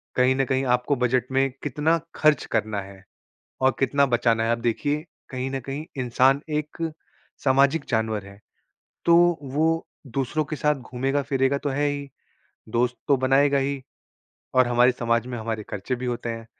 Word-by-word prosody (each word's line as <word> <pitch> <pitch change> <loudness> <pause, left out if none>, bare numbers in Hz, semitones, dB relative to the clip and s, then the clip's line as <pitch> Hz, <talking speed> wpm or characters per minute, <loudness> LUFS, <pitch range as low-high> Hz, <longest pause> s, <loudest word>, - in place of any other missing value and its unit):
कहीं 130 +1 +4
न 135 - +1
कहीं 130 0 0
आपको 125 +3 -1
बजट 125 -1 +1
में 135 +1 +2
कितना 150 +4 +1 0.2
ख़र्च 150 -3 +3
करना 105 -1 0
है 95 0 -12 0.6
और 130 - +5
कितना 140 +1 +3
बचाना 120 -3 +2
है। 115 - +1
अब 115 0 -1
देखिए 145 +6 0 0.3
कहीं 130 0 -3
न 135 - -2
कहीं 140 +3 -5 0.2
इंसान 130 +3 +3 0.2
एक 150 0 -8 0.7
सामाजिक 140 +3 +3
जानवर 110 -3 -1
है। 100 0 -13 0.7
तो 170 - +6 0.3
वो 155 +4 0 0.3
दूसरों 135 +4 0
के 155 +2 -4
साथ 150 0 +1 0.2
घूमेगा-फिरेगा 135 +1 0
तो 145 - -3
है 145 +2 0
ही, 145 -1 -3 0.6
दोस्त 120 +2 +1
तो 140 -2 +4
बनाएगा 135 +2 +3
ही 135 0 -1 0.7
और 130 -1 +5
हमारे 120 +1 +4
समाज 115 -1 0
में 125 -1 -5
हमारे 110 -1 -3
ख़र्चे 105 +5 -3
भी 125 +1 -5
होते 120 -1 -3
हैं। 115 -1 -5
130 Hz, 165 wpm, -24 LUFS, 120-140 Hz, 0.7 s, तो